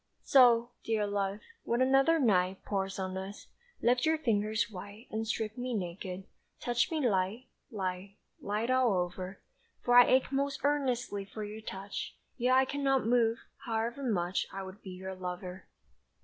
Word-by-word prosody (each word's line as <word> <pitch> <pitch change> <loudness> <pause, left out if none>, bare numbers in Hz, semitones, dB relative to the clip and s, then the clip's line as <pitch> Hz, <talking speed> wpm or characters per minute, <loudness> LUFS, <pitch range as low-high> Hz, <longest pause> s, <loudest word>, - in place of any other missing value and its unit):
So, 240 -3 +6
dear 220 -2 0
love, 200 0 -2 0.2
when 235 - -1
another 270 +5 +4
night 190 - +2
Pours 195 -1 -2
on 185 -1 -3
us, 195 +2 -7 0.4
lift 245 +1 +3
your 320 0 +3
fingers 215 -6 +1
white 205 +4 -9
And 220 +1 -2
strip 215 -1 -2
me 250 -1 -2
naked, 185 0 -4 0.4
touch 240 -1 +1
me 310 -6 +1
light, 200 +4 0 0.2
Light, 190 -1 -4 0.2
light 215 +4 -1
all 255 -4 +4
over. 180 +1 -2 0.5
For 245 - +2
I 245 0 +9
ache 260 +1 +3
most 275 0 -1
earnestly 250 -8 0
for 210 +2 -7
your 210 +1 -7
touch, 200 -1 -6 0.2
Yet 255 0 +3
I 265 0 +5
cannot 270 -2 +1
move, 230 -1 +3 0.3
however 230 +2 -2
much 185 -8 0
I 195 0 -5
would 190 +3 -10
be 190 - -9
your 190 +1 -6
lover. 180 0 -6
215 Hz, 160 wpm, -31 LUFS, 190-245 Hz, 0.5 s, I